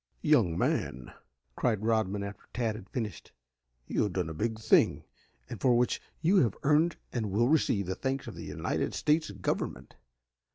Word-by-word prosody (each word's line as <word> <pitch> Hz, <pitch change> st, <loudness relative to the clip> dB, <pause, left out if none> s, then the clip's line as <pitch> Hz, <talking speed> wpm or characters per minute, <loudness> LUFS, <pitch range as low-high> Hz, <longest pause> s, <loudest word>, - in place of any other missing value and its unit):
"Young 85 Hz, -1 st, +3 dB
man," 65 Hz, -4 st, -1 dB, 0.4 s
cried 110 Hz, -4 st, 0 dB
Rodman 105 Hz, -3 st, +1 dB
after 100 Hz, 0 st, -7 dB
Tad 115 Hz, -2 st, 0 dB
had 100 Hz, -2 st, -10 dB
finished, 110 Hz, -5 st, -5 dB, 0.5 s
"you -, -, -1 dB
have 105 Hz, -4 st, 0 dB
done 90 Hz, -3 st, -1 dB
a -, -, -5 dB
big 110 Hz, +7 st, -2 dB
thing, 110 Hz, -, +3 dB, 0.4 s
and -, -, -8 dB
for 125 Hz, -3 st, +4 dB
which 125 Hz, 0 st, +1 dB, 0.2 s
you 185 Hz, +5 st, +4 dB
have 120 Hz, -, +3 dB
earned 155 Hz, +3 st, +3 dB, 0.2 s
and 110 Hz, -4 st, -1 dB
will 110 Hz, +5 st, +2 dB
receive 125 Hz, -10 st, +2 dB
the 95 Hz, -, -2 dB
thanks 135 Hz, +5 st, -2 dB
of -, -, -7 dB
the -, -, -8 dB
United -, -, -2 dB
States 155 Hz, -1 st, +2 dB
Government. 100 Hz, -2 st, -3 dB
110 Hz, 170 wpm, -30 LUFS, 100-130 Hz, 0.5 s, for